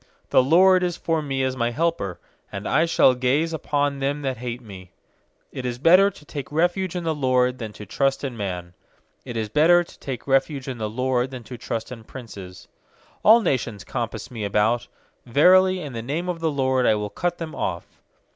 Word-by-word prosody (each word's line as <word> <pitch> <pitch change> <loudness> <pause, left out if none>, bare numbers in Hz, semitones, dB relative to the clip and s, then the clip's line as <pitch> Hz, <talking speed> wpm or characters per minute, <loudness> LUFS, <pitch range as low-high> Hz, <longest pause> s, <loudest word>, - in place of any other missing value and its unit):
7The - - +5
LORD 185 +3 +6
is 175 -1 -1
for 165 -1 -1
me 135 -2 -2
as 130 0 -1
my 120 -2 0
helper; 150 - -2 0.3
And 100 +1 -5
I 160 +4 +2
shall 130 -5 +5
gaze 135 +6 0
upon 145 -3 -1
them 140 +2 -2
that 130 -2 -2
hate 120 0 -5
me. 95 -6 -12 0.6
8It 130 - -5
is 125 -1 -3
better 180 +8 +6
to 150 - -16
take 145 -1 -7
refuge 175 +3 0
in 175 - -3
the 165 -1 0
LORD 130 -3 +1
Than 110 -3 -5
to 105 - -10
trust 135 +8 0
in 130 -3 -3
man. 90 -5 -5 0.5
9It 120 - -6
is 110 -2 -2
better 170 +7 +5
to - - -17
take 130 -4 -6
refuge 135 0 +1
in 130 -3 -5
the 110 -1 -2
LORD 125 +2 0
Than 130 -2 -8
to 125 - -9
trust 115 0 -5
in 115 -3 -8
princes. 100 -7 -10 0.6
10A11 225 +2 +7
nations 115 - -1
compass 115 -1 -5
me 115 -3 -5
about, 110 +4 +1 0.4
Verily, 185 +8 +5
in 145 -5 -7
the 115 - -4
name 155 +9 -3
of 175 -2 -3
the 165 -1 0
LORD 130 -3 +1
I - - +4
will 105 -1 -4
cut 175 +10 -2
them 165 -2 -6
off. - - -3
130 Hz, 205 wpm, -23 LUFS, 115-160 Hz, 0.6 s, 10A11